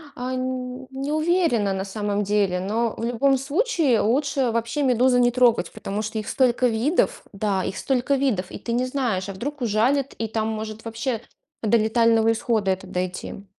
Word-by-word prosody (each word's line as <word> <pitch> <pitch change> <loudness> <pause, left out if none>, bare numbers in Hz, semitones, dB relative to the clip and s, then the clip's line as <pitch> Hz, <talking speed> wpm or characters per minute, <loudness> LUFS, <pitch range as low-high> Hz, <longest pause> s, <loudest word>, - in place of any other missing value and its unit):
А 250 +1 -4
нь 255 0 -4
не 270 +2 -4
уверена 310 - +2
на 190 0 -3
самом 205 0 -2
деле, 200 -3 +1
но 220 +4 -1
в - - -5
любом 265 +3 +2
случае 295 - +1
лучше 270 +2 +1
вообще 230 +5 -1
медузы 250 -1 +3
не 245 0 +4
трогать, 245 -2 +3
потому 210 -1 -4
что 220 +1 -4
их 215 - -6
столько 250 -1 +2
видов, 280 - +1
да, 195 -1 -1
их - - -4
столько 265 +1 +1
видов, 245 -10 0
и - - -6
ты 235 - -4
не 250 +2 +1
знаешь, 240 -8 -1
а - - -4
вдруг 280 +9 -5
ужалит, 245 +5 +1
и 225 - -3
там 220 0 -1
может 220 0 -5
вообще 230 +1 -3 0.4
до 225 +2 +4
летального 225 0 +3
исхода 220 -3 0
это 190 0 -4
дойти. 185 +2 -4
235 Hz, 180 wpm, -23 LUFS, 215-260 Hz, 0.4 s, не